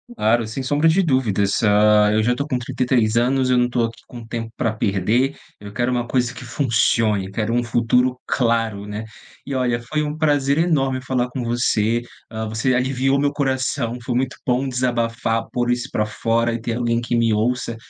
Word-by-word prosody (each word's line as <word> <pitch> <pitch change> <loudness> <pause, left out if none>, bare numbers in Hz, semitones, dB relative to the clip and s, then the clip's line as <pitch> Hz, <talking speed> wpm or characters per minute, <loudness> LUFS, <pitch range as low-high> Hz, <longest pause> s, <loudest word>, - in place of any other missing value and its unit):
Claro, 115 - +1
sem 130 +4 -5
sombra 145 +4 +2
de 180 +4 +3
dúvidas. 115 - +1
Hã, 105 0 +4
eu 110 0 +2
já 125 +2 +2
tô 140 +4 -3
com 130 - -1
33 120 -2 0
anos, 130 +2 +2
eu 125 - +3
não 120 0 +2
tô 120 -1 0
aqui 115 0 -4
com 120 -2 -10
tempo 115 0 -5
pra 115 -3 0
perder, 110 +6 0 0.2
eu 100 0 -10
quero 120 +4 0
uma 120 -1 -1
coisa 125 0 0
que 120 - -10
funcione, 110 -5 +1
quero 110 +3 -2
um 120 - +2
futuro 120 +2 +1
claro, 115 -5 0
né. 105 +1 -5 0.4
E 140 - -5
olha, 125 -2 0
foi 150 +6 -2 0.2
prazer 145 -3 +2
enorme 135 -6 +1
falar 125 -1 0
com 125 0 -4
você, 120 -1 +1 0.3
hã, 110 -1 -4
você 110 +4 0
aliviou 130 +2 +1
meu 145 0 +1
coração, 130 -3 -1
foi 120 +1 -3
muito 130 +1 -1
bom 130 +2 0
desabafar, 115 -2 -1
pôr 120 0 0
isso 120 0 -2
pra 105 - 0
fora 115 +2 0
e 115 - -4
ter 115 0 -3
alguém 120 -1 0
que 120 - -4
me 115 -2 +2
ouça 115 +2 -1
120 Hz, 195 wpm, -21 LUFS, 115-130 Hz, 0.4 s, Hã